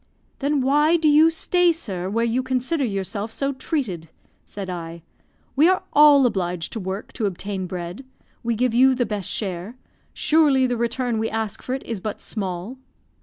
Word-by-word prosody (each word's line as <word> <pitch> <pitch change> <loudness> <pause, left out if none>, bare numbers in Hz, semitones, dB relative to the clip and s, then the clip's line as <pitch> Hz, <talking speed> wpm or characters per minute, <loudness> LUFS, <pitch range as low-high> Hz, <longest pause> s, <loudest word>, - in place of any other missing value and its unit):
"Then 285 0 +1
why 295 +5 +3
do 320 -2 +1
you 305 +2 +6
stay, 350 +2 +2
sir, 190 - -4
where 230 +3 0
you 235 +2 +1
consider 260 +4 -1
yourself 200 0 -3
so 275 +4 -2
treated?" 225 - -3 0.4
said 200 -2 -7
I. 170 -2 -6 0.5
"We 305 +6 +5
are 370 - +1
all 290 -2 +7
obliged 180 -7 -1
to 225 - -3
work 190 +1 -5
to 215 - -1
obtain 195 0 -4
bread; 180 +6 -6 0.4
we 235 -1 -1
give 245 +1 +1
you 260 +2 +5
the 245 -1 0
best 205 -5 -4
share 190 +2 -4 0.4
surely 300 -4 +3
the 245 -1 0
return 235 0 -1
we 225 - -1
ask 220 -2 -3
for 255 - -3
it 265 - -6
is 220 -5 -5
but 215 +1 -4
small." 195 +3 -4
230 Hz, 175 wpm, -23 LUFS, 195-275 Hz, 0.5 s, all